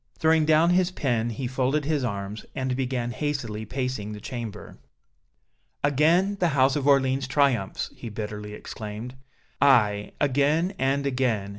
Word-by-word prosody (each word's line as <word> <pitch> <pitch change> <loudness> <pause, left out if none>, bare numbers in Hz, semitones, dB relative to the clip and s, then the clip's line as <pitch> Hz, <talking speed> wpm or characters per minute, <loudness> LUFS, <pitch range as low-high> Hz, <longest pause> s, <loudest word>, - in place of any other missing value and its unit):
Throwing 160 -1 +3
down 160 +2 +4
his 180 0 +3
pen, 120 -9 -1
he 120 +3 -4
folded 130 +3 0
his 150 -3 0
arms, 100 -2 -4
and 130 -1 -1
began 125 -2 -2
hastily 120 -6 -3
pacing 125 -4 -3
the 105 - -7
chamber. 115 -3 -7 1.0
"Again 165 +8 +3
the 180 - +3
House 130 0 +4
of 145 -2 -1
Orléans 135 -1 +3
triumphs!" 130 -8 +1
he 115 - -7
bitterly 105 0 -6
exclaimed. 110 +4 -7 0.5
"Aye, 105 -7 +3
again 145 +6 +2
and 135 +1 +1
again! 125 -7 0
130 Hz, 140 wpm, -25 LUFS, 110-145 Hz, 1.0 s, down